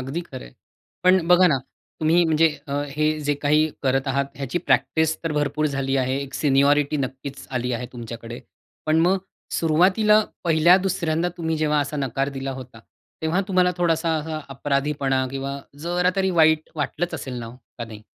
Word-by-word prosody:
अगदी 135 +6 -4
खरं - - -8
आहे. - - -15 0.5
पण 185 -2 +4
बघा 180 +1 +6
ना, 140 -6 +3 0.4
तुम्ही 165 +2 +4
म्हणजे 160 0 +4 0.2
अ, - - -4 0.2
हे 155 +2 0
जे 145 0 0
काही 150 +2 +3
करत 135 0 +1
आहात 140 +1 +1
ह्याची 140 +4 -2
प्रॅक्टिस 160 -2 +1
तर 165 - -1
भरपूर 150 +1 0
झाली 135 -1 -1
आहे. 130 0 0
एक 135 -1 -9
सिनियॉरिटी 145 +1 +3
नक्कीच 135 0 -5
आली 125 -1 -2
आहे 120 +1 -3
तुमच्याकडे. 115 0 -8 0.5
पण 155 +1 +3
मग 185 +3 +3 0.4
सुरुवातीला 185 +7 +4 0.2
पहिल्या 170 +2 +5
दुसऱ्यांदा 170 -1 0
तुम्ही 160 -1 -2
जेव्हा 150 -1 +1
असा 145 +1 -3
नकार 135 0 -1
दिला 135 0 -3
होता, 130 -3 -10 0.4
तेव्हा 165 +4 +1
तुम्हाला 180 -1 +3
थोडासा 165 -2 +1
असा 155 0 -4
अपराधीपणा 140 -1 -1
किंवा 135 +1 -4 0.2
जरा 180 +2 +1
तरी 190 -1 +2
वाईट 160 -2 +3
वाटलंच 160 +3 -2
असेल 130 -2 -6
ना 115 - -6
हो, 120 +2 -11 0.2
का 120 - -3
नाही? 110 -1 -11
150 Hz, 170 wpm, -23 LUFS, 135-165 Hz, 0.5 s, बघा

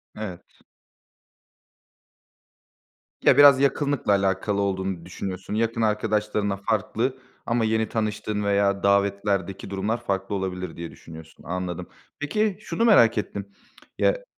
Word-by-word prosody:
Evet. 100 -5 -8 2.6
Ya, - - +5
biraz 140 -2 +8
yakınlıkla 140 -4 +1
alakalı 100 +1 +1
olduğunu 95 -3 -2
düşünüyorsun. 95 +2 -6
Yakın 115 +1 0
arkadaşlarınla 105 -2 0
farklı 115 +5 -1 0.3
ama 115 -1 +1
yeni 110 0 0
tanıştığın 105 -1 -2
veya 100 -1 +1
davetlerdeki 100 -1 +1
durumlar 100 +4 -1
farklı 95 +1 -2
olabilir, 90 -3 -4
diye 85 -1 -6
düşünüyorsun. 80 -1 -13
Anladım. 90 0 -4 0.3
Peki, 205 +6 0
şunu 230 +2 -1
merak 115 - +6
ettim. 100 -1 -3 0.5
Ya, - - +1
100 Hz, 110 wpm, -25 LUFS, 95-115 Hz, 2.6 s, biraz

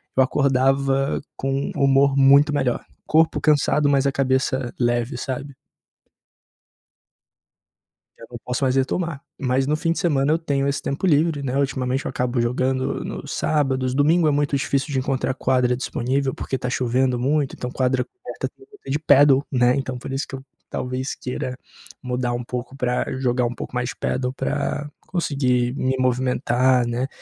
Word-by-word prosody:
eu 130 - +4
acordava 135 0 +1 0.2
com 135 +1 -2
humor 140 0 +3
muito 140 +2 +6
melhor, 125 -4 0 0.2
corpo 160 +1 +3
cansado, 150 -1 +3
mas 140 -1 +2
a 140 - +3
cabeça 130 -1 0
leve, 120 +1 0
sabe? 140 +1 -5 2.6
Eu 115 - -12
não 120 - -7
posso 125 +2 -3
mais 130 0 +1
retomar, 140 +3 -1 0.2
mas 130 0 +1
no 150 - +1
fim 165 +2 -1
de - - -4
semana 145 -6 +1
eu 160 - +2
tenho 140 -4 -1
esse 140 0 -1
tempo 140 +7 -2
livre, 155 -2 +2
né. 135 -1 -2
Ultimamente 135 -1 -1
eu - - -2
acabo 125 0 -1
jogando 130 +2 -1
nos - - -6
sábados, 135 -4 0
domingo 155 +4 +3
é - - +4
muito 145 -1 +1
difícil 140 +1 -1
de 135 - 0
encontrar 130 0 -1
quadra 125 -1 +1
disponível 130 +2 -1
porque 130 - -3
tá 125 -1 -3
chovendo 125 0 +1
muito, 140 +2 0
então 125 - -5
quadra 130 -1 +1
coberta 380 - -7
eu 400 - -17
vou 415 - -16
ter - - -8
de 145 - +1
pádel, 140 -2 +5
né, 125 -2 +3
então, 130 -2 -3
por 125 - -7
isso 135 +2 -2
que 135 - -6
eu 135 - -10 0.3
talvez 130 +1 -3
queira 125 0 -5 0.5
mudar 125 -1 -2
um 120 0 -3
pouco 125 +2 -6
pra 125 -2 0
jogar 125 -1 +1
um 120 - -3
pouco 125 - -8
mais 125 0 -1
pádel 125 0 -2
pra 145 +2 -2 0.2
conseguir 130 -8 0
me 130 -1 0
movimentar, 125 0 +2
né, 120 +3 -2
135 Hz, 170 wpm, -22 LUFS, 125-140 Hz, 2.6 s, muito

